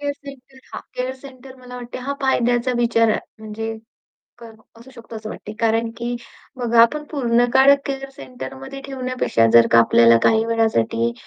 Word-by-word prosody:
care 285 0 -2
centre 270 -1 -13
हां, - - -6
care 255 +1 -3
centre 260 -1 -13
मला 250 -1 -11
वाटते 245 0 -8
हा 265 +3 -4
फायद्याचा 245 -1 +1
विचार 230 -1 +2
आहे 215 - +1 0.2
म्हणजे 220 +1 -6 0.6
का 235 -1 -12 0.3
असू 240 +3 -15
शकतो 230 -2 -11
असं 215 0 -8
वाटते 210 - -9
कारण, 225 0 +1
की 240 +1 -4 0.4
बघा 235 -2 +2
आपण 300 +6 +1
पूर्ण 245 -5 +1
काळ 265 +1 +7
केअर 270 -1 -5
सेंटरमध्ये 270 +1 -9
ठेवण्यापेक्षा, 255 - 0
जर 115 0 +7
का 115 - +5
आपल्याला 115 0 +5
काही 220 0 +3
वेळासाठी 120 - 0
240 Hz, 165 wpm, -20 LUFS, 225-265 Hz, 0.6 s, काळ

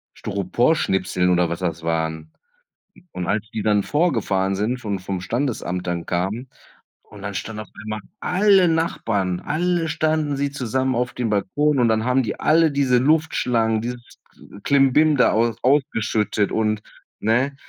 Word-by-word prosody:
Styroporschnipseln 95 - 0
oder 90 -1 +2
was 85 - -4
das 85 -3 -3
waren. 80 -1 -2 0.8
Und 90 -1 -5
als 105 +1 -1
die 110 - -2
dann 105 -2 +2
vorgefahren 105 - 0
sind, 115 +6 -1
von 100 -3 -3
vom 95 -1 -4
Standesamt 95 -6 -2
dann 85 -1 -2
kamen 100 +9 -2 0.5
und 105 -1 -14
dann 100 0 -4
standen 105 +2 -5
auf - - -21
einmal 110 -1 -5 0.2
alle 190 -1 +4
Nachbarn, 110 - -1
alle 170 +1 -1
standen 155 -2 0
sie 140 0 -1
zusammen 130 -1 -1
auf 125 0 -1
dem 120 -3 -2
Balkon 140 +9 +1
und 120 - +4
dann 110 +1 +1
haben 125 +1 +2
die 110 - -4
alle 160 0 +4
diese 135 -3 +2
Luftschlangen, 125 -7 +1
dieses 120 0 -7 0.2
äh, 100 - -14
Klimbim 140 +2 +4
da 125 - +4
aus 115 +1 +1
ausgeschüttet 110 -6 +1
und, 110 -1 0 0.4
ne? 125 +6 +1
115 Hz, 155 wpm, -22 LUFS, 100-140 Hz, 0.8 s, alle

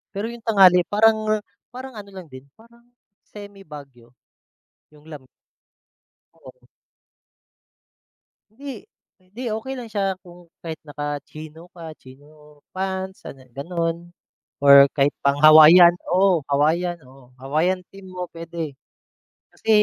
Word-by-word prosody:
Pero 220 +4 -4
yung 235 - -12
tanghali 190 -5 +5
parang 215 0 +1 0.3
parang 255 +1 -10
ano 200 -1 -12
lang 190 -2 -11
din, 130 +1 -13
parang 235 +1 -22 0.5
semi-Baguio. 150 - -14 0.8
Yung 150 +2 -19
lam 145 -4 -12 1.1
Oo. - - -17 1.9
Hindi. 275 +3 -10 0.4
Hindi, 190 +7 -13
okey 265 +5 -6
lang 235 - -9
siya 195 -3 -3
kung 175 -2 -18
kahit 165 -1 -7
naka-chino 150 +3 -8
ka, 165 -3 -10
chino 150 +3 -19 0.2
pants, 190 0 -5
ano, 130 -1 -12
gano'n, 170 +3 -4 0.5
or 140 0 +7
kahit 140 0 0
pang-Hawaiian. 155 +5 +7 0.2
Oo, 185 -4 +2
Hawaiian. 170 +4 0
Oo, 130 -1 -19
Hawaiian 155 +8 -1
team 195 -1 -15
mo 180 0 -6
puwede, 165 -3 -7 0.8
kasi - - -10
175 Hz, 110 wpm, -21 LUFS, 150-195 Hz, 1.9 s, or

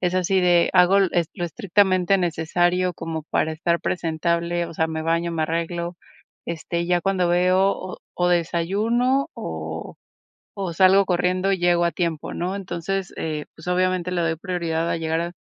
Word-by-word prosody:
es 180 0 0
así 185 +1 +2
de 175 -1 +4
hago 185 +1 +5
e 180 -3 +2
lo 175 - -3
estrictamente 190 0 +2
necesario 175 +1 +1
como 165 -1 -5
para 160 - +1
estar 170 +2 0
presentable, 170 0 -1
o 165 - -10
sea, 160 0 0
me 160 0 -3
baño, 165 +1 0
me 165 -2 -1
arreglo, 170 +2 -2 0.5
este, 170 +1 -3
ya 175 0 +2
cuando 185 -1 +1
veo 185 +1 +1 0.2
o 175 0 +1
desayuno 210 +10 +1
o 80 0 -6 0.6
o 190 -3 -3
salgo 190 +3 +5
corriendo 180 +1 +1
y 190 - 0
llego 175 0 +3
a 170 - +2
tiempo, 170 -4 -3
¿no? 180 +3 -2
Entonces, 190 0 -4
eh, 155 -2 -3
pues 160 - -13
obviamente 180 0 0
le 175 - 0
doy 165 -1 0
prioridad 170 -2 -2
a - - 0
llegar 160 0 -1
a 170 +1 -3
175 Hz, 165 wpm, -23 LUFS, 165-185 Hz, 0.6 s, hago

